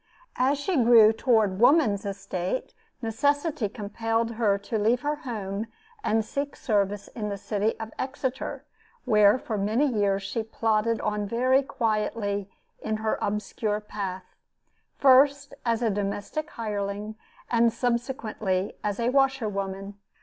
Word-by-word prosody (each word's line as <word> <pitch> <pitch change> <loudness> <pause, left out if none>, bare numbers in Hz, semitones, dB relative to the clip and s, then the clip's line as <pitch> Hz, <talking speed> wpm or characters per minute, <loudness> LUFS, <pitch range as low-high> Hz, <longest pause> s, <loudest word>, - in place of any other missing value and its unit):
As 265 +3 +3
she 320 +5 -1
grew 230 -3 +7
toward 220 -5 +2
woman's 235 -6 +4
estate, 195 +2 -3 0.3
necessity 285 - 0
compelled 225 +3 -2
her 220 -3 +1
to 200 +2 -3
leave 230 +4 +2
her 295 +2 -1
home 215 -5 -4 0.4
and 220 - +1
seek 280 +4 -3
service 205 -3 0
in 210 -3 -4
the 200 - -3
city 210 +2 -1
of 220 0 -6
Exeter, 265 -1 -3 0.4
where 210 -2 +5
for 220 -4 -4
many 215 +8 +2
years, 200 -6 +1
she 200 +4 -2
plodded 225 0 0
on 210 -1 -1
very 255 +5 +3
quietly 210 -5 -1 0.3
in 220 0 -2
her 220 0 -1
obscure 210 +1 -1
path, 195 -3 -5 0.7
first, 280 +1 +5
as 230 +1 +1
a 225 - +2
domestic 205 +9 -3
hireling, 210 -1 -4 0.4
and 235 -1 +4
subsequently 230 -5 -1
as 205 0 -2
a 235 +1 +1
washer 270 -3 +2
woman. 195 0 -5
220 Hz, 135 wpm, -26 LUFS, 205-245 Hz, 0.7 s, grew